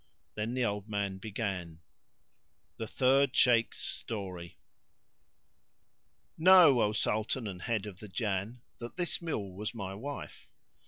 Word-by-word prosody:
Then 110 +3 -3
the 130 -1 +1
old 105 -1 -3
man 100 -2 -2
began 95 -6 -4 1.0
The 110 - -4
Third 135 +3 +3
Shaykh's 115 -2 +4
Story. 90 -6 -6 1.8
Know, 165 -7 +8
O 105 - +3
Sultan 110 +3 -1
and 95 -3 -6
head 110 -1 -1
of 95 -3 -9
the 105 - -9
Jann, 105 +3 -3 0.2
that 120 0 -7
this 175 -1 -2
mule 105 - -3
was 105 +4 -4
my 95 -3 -5
wife. 135 +7 -7
110 Hz, 125 wpm, -31 LUFS, 100-125 Hz, 1.8 s, Know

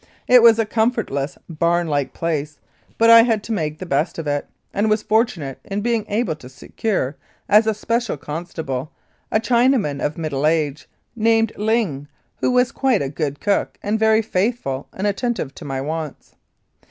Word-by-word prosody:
It 250 -1 +7
was 230 -1 +7
a 225 - +1
comfortless, 220 - -1
barn 170 +1 +1
like 145 -3 -1
place, 155 -3 -3 0.4
but 230 0 +6
I 230 0 +10
had 225 -3 +1
to - - -6
make 155 -7 -2
the 185 - -7
best 150 +1 0
of 165 - -4
it, 145 -1 -1 0.3
and 205 +2 +1
was 215 0 +1
fortunate 210 - 0
in 200 +1 -3
being 230 -1 0
able 205 -6 0
to 125 - -12
secure, 145 - -3 0.3
as 215 +2 +5
a 220 - +2
special 230 -2 -1
constable, 150 -3 -5 0.4
a 215 - +3
Chinaman 235 - +2
of 150 - -2
middle 155 -3 -1
age, 155 -3 -1 0.3
named 225 0 +2
Ling, 210 -10 0 0.3
who - - 0
was 250 0 +3
quite 260 - +1
a 135 - -3
good 145 -1 -3
cook 205 -1 0
and 210 +2 0
very 220 0 +4
faithful 185 - -1
and 190 - -4
attentive 205 - -1
to - - -11
my 135 -2 -3
wants. 155 +1 -5
195 Hz, 175 wpm, -21 LUFS, 150-225 Hz, 0.4 s, I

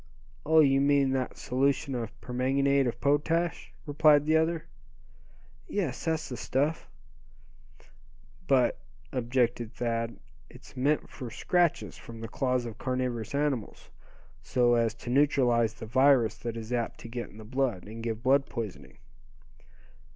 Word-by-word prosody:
"Oh! 160 0 +6
you 135 -2 +4
mean 140 -1 +3
that 130 -1 -2
solution 135 +2 0
of 115 -1 -5
permanganate 135 +2 +1
of 120 0 -3
potash," 160 +5 0
replied 150 0 +4
the 155 +1 +3
other. 160 +1 +1 1.0
"Yes, 170 -11 -3
that's 160 -1 -1
the 125 - -6
stuff." 145 +6 -1 1.6
"But," 130 -3 +3 0.3
objected 120 -2 -1
Thad, 115 -1 -2 0.3
"it's - - -15
meant 140 +4 +1
for 125 -4 -8
scratches 175 +8 0
from 115 -1 -10
the 115 - -6
claws 125 +1 -1
of 115 -3 -8
carnivorous 125 -2 -2
animals, 140 -5 -2 0.5
so 120 -1 +2
as 115 -1 +1
to 120 - -7
neutralize 125 -5 +3
the 115 - -8
virus 125 -2 +4
that 115 -1 -5
is 115 +2 -5
apt 120 -2 -2
to - - -8
get 120 +1 -5
in 105 - -15
the 110 - -10
blood, 120 -4 -1
and 110 +2 -9
give 115 0 -4
blood 135 +2 +3
poisoning." 75 - -7
125 Hz, 140 wpm, -29 LUFS, 115-140 Hz, 1.6 s, Oh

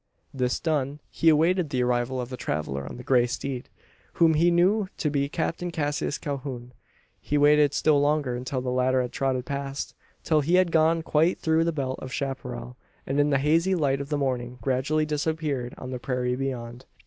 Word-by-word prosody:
This 125 -2 0
done, 145 -3 -1
he 165 - +3
awaited 165 +2 +3
the 125 -3 0
arrival 125 +1 0
of 125 -1 -4
the 130 - -5
traveller 70 - -3
on - - -8
the 125 - -9
grey 125 -1 +3
steed 125 +1 -4 0.4
whom 165 -1 +4
he 165 +3 +4
knew 190 +4 +3
to 150 - -1
be 140 -1 0
Captain 165 +3 -2
Cassius 145 -2 -2
Calhoun. 130 -3 -5 0.5
He 150 - -1
waited 145 0 +5
still 150 -2 +3
longer 145 -3 +1
until 130 +1 -3
the 125 0 -2
latter 130 0 +2
had 125 - -5
trotted 130 -2 -1
past; 140 0 -4 0.3
until 155 -2 +3
he 165 +5 +2
had 185 -2 +3
gone 160 +1 +3
quite 160 +3 +2
through 160 0 +2
the 170 - +1
belt 135 -4 -3
of 130 - -7
chapparal, 95 - -5 0.3
and 135 +2 -1
in 145 0 +3
the 140 - +3
hazy 165 +7 +2
light 140 -4 +1
of 140 - -7
the 150 - 0
morning 125 -3 -2
gradually 135 +5 0
disappeared 150 -4 -2
on 130 - -7
the 125 - -4
prairie 125 0 -1
beyond. 125 -2 -5
140 Hz, 195 wpm, -26 LUFS, 125-155 Hz, 0.5 s, waited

